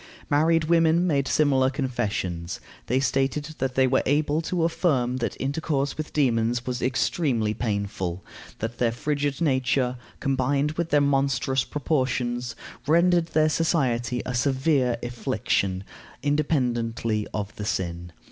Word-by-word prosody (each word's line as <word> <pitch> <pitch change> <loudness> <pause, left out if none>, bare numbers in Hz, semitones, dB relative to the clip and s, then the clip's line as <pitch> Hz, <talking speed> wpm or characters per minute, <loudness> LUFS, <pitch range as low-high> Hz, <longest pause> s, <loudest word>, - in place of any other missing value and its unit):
Married 160 +3 +3
women 165 +1 +3
made 140 -6 +1
similar 135 -3 +3
confessions. 105 - -3 0.3
They 130 +3 +2
stated 135 +3 0
that 130 -1 -1
they 130 - +4
were 130 +1 +3
able 150 +2 +2
to 170 +1 -1
affirm 135 -7 +1
that 120 - -3
intercourse 140 0 -1
with 155 -1 -5
demons 120 -4 +1
was 125 -1 -3
extremely 130 -4 +1
painful; 100 -5 -3 0.3
that 115 +2 -5
their 120 -2 +2
frigid 145 +3 -2
nature, 130 -3 +1 0.2
combined 140 +2 +1
with 165 +1 -3
their 145 - +4
monstrous 135 -1 +1
proportions, 125 -5 -1 0.3
rendered 170 +1 +4
their 155 -2 +3
society 130 -7 0
a 125 - -3
severe 130 -1 +1
affliction, 115 -6 -1 0.4
independently 120 -7 0
of 105 -1 -4
the 105 - -4
sin. 85 -3 -3
130 Hz, 130 wpm, -25 LUFS, 120-150 Hz, 0.4 s, they